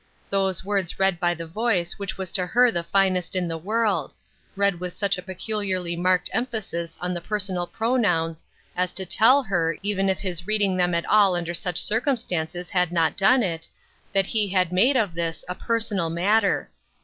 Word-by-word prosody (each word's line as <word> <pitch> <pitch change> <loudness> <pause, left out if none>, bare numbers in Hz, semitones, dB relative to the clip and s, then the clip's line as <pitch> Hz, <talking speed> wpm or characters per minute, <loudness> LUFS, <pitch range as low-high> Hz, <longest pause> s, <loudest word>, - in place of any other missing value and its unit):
Those 190 -2 0
words 195 -3 -1
read 190 -3 +2
by 175 0 +1
the 165 0 -6
voice 180 -1 -1
which 200 - -4
was 190 -2 -4
to 180 -2 +1
her 245 +4 +4
the 170 - -1
finest 185 0 +1
in 180 -1 0
the 165 - -3
world 215 +4 0 0.2
— - - -36
read 200 -3 +2
with 180 -1 -4
such 200 -1 +1
a 180 - -6
peculiarly 185 -2 -2
marked 180 +1 +1
emphasis 200 -9 -3
on 180 0 -2
the 175 - -4
personal 185 -3 -2
pronouns 180 -10 0 0.3
as 180 0 -1
to 190 +1 -3
tell 235 +9 +5
her, 165 -6 0
even 195 -1 +1
if 190 - +1
his 175 -3 -4
reading 205 -3 +1
them 180 -1 +1
at 170 - -1
all 205 -4 +4
under 175 -1 -3
such 175 0 -3
circumstances 180 - -1
had 180 -2 +1
not 165 -2 +1
done 235 +6 +4
it, 165 -4 -3 0.4
that 195 -1 +2
he 210 +1 0
had 185 -2 +1
made 245 +9 +4
of 210 -7 0
this 165 -1 -3
a 180 - -3
personal 210 -5 -1
matter. 200 +5 +1
185 Hz, 190 wpm, -24 LUFS, 175-205 Hz, 0.4 s, tell